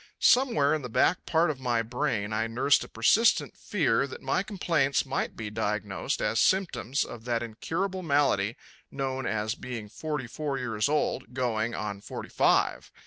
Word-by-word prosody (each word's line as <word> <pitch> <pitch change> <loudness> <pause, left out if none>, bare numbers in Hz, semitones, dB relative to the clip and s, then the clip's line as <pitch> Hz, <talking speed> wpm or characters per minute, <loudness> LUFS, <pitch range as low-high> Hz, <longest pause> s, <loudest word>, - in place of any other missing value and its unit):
Somewhere 235 - +4
in 155 - 0
the 125 - -6
back 170 +9 +2
part 165 0 +3
of 140 - -8
my 120 -3 0
brain 115 -3 -2
I 110 +1 0
nursed 125 +5 +3
a - - -9
persistent 215 - +3
fear 140 - +1
that 130 - -10
my 135 +7 +1
complaints 170 -10 0
might 135 - -2
be 110 -2 -5
diagnosed 105 -2 -2
as 110 +2 +1
symptoms 180 - +1
of 115 -1 -10
that 120 -1 0
incurable 175 - -3
malady 140 - +1 0.3
known 135 -1 -3
as 110 0 -1
being 120 -5 -7
forty 150 +2 -4
four 140 +2 -3
years 115 -1 -1
old, 135 -6 -1
going, 120 -3 -1
on 100 -2 -4
forty - - -7
five. - - +2
130 Hz, 165 wpm, -28 LUFS, 110-150 Hz, 0.3 s, Somewhere